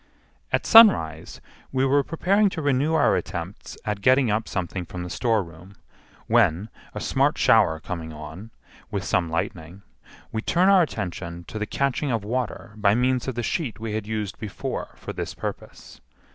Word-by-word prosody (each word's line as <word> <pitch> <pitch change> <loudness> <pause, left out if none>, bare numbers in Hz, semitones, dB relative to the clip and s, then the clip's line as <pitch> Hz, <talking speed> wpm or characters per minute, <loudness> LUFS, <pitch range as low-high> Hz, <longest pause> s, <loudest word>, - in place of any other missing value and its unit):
At - - 0
sunrise 135 - +5 0.3
we 130 0 +1
were 140 +1 +3
preparing 195 +7 +2
to 170 -4 -5
renew 145 +3 +2
our 150 - +4
attempts 90 +2 -5
at 105 -1 -2
getting 130 +1 +4
up 110 +2 -1
something 95 -1 -3
from 90 +1 -7
the 90 - -7
storeroom, 95 -5 -2 0.5
when, 105 -3 +2 0.3
a - - -3
smart - - +1
shower 80 0 +4
coming 80 -1 -6
on, 80 +8 -9 0.4
with 100 -2 -3
some 90 -3 0
lightning, 85 +3 -4 0.5
we 110 - -2
turn 180 +10 +3
our 195 -2 +6
attention 90 - -4
to 110 - -5
the 105 - -2
catching 140 +3 -1
of 115 -3 -1
water 115 0 -3
by 105 -1 +3
means 125 +1 +1
of 130 - -3
the 120 - -2
sheet 125 -3 -2
we 110 -1 -4
had 110 -1 -3
used 105 -3 -4
before 105 -4 -5
for - - -8
this - - -5
purpose. - - -8
110 Hz, 170 wpm, -24 LUFS, 90-130 Hz, 0.5 s, our